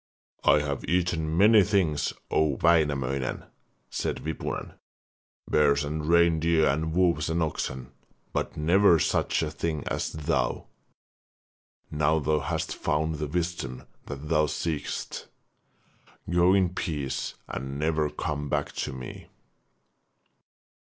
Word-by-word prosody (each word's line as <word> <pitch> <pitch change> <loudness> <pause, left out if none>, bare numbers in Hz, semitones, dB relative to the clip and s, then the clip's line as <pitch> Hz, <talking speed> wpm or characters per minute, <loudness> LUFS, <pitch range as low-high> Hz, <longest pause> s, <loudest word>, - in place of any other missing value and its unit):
'I 75 - +5
have 70 -2 -3
eaten 85 -2 0
many 105 +3 +7
things, 95 -7 +1 0.2
O 75 -3 +2
Wainamoinen,' 70 -6 +1 0.5
said - - -3
Wipunen, 80 - -4 0.7
'bears 70 -1 +3
and 75 +1 -3
reindeer, 85 -3 +4
wolves 80 -2 +1
and 80 0 +1
oxen, 65 -4 -4 0.4
but - - -2
never 85 +3 +5
such 80 - +1
a 75 - -2
thing 80 -2 -3
as - - -2
thou. 75 -1 -1 1.3
Now 75 +1 +2
thou 75 0 +1
hast - - -2
found 80 +1 -1
the 75 - -2
wisdom 80 -6 -3 0.2
that 70 +1 -7
thou 75 -1 +3
seekest, 75 0 -4 1.0
go 90 +2 +4
in 95 -2 +3
peace 75 -7 -3
and 70 +1 -5
never 75 0 +1
come 75 -1 -4
back 75 0 -1
to - - -3
me.' 65 -1 -8
80 Hz, 115 wpm, -27 LUFS, 75-85 Hz, 1.3 s, many